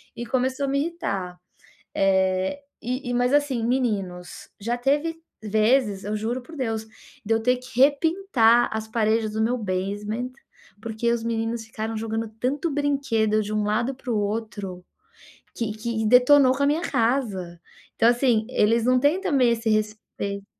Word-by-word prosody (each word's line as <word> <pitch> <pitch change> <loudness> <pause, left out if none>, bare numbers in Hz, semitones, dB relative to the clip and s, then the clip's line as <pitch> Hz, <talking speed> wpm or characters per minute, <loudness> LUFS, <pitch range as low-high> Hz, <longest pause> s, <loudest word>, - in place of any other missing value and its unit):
E 240 - -5
começou 260 +3 0
a - - -2
me 280 +1 +1
irritar. 200 - -3 0.6
Eh, 190 +5 +1 0.2
e 250 +2 -4
e, - - -1
mas 245 +1 +2
assim, 285 -5 +1
meninos, 200 -8 -2
já 235 +4 -1
teve 290 +6 0 0.3
vezes, 215 -1 +2
eu 210 +1 -2
juro 230 +4 -2
por 285 +6 -13
Deus, 225 -5 -2 0.4
de 225 +2 +1
eu 225 - 0
ter 250 +2 +3
que 250 -1 -10
repintar 285 - +4
as 220 0 -3
paredes 220 -1 +1
do 220 +1 -1
meu 245 +3 +1
basement, 205 +4 -3 0.5
porque 230 +1 -1
os 235 -1 -1
meninos 225 0 -2
ficaram 220 0 -5
jogando 225 +1 -3
tanto 285 +6 -1
brinquedo 275 -7 +1
de 210 - -5
um 215 -1 0
lado 235 +5 0
pro 250 -3 -3
outro 205 -3 -3 0.7
que 230 -2 -2
que 220 0 -3
detonou 255 +3 +6
com 280 - 0
a - - +4
minha 300 +3 +1
casa. 225 - -1 0.4
Então, 230 - +4
assim, 240 -3 +2
eles 225 +2 +2
não 255 0 +4
têm 295 +8 +2
também 275 -10 +3
esse 230 -1 -1
respeito 210 -2 -2
230 Hz, 160 wpm, -24 LUFS, 215-260 Hz, 0.7 s, detonou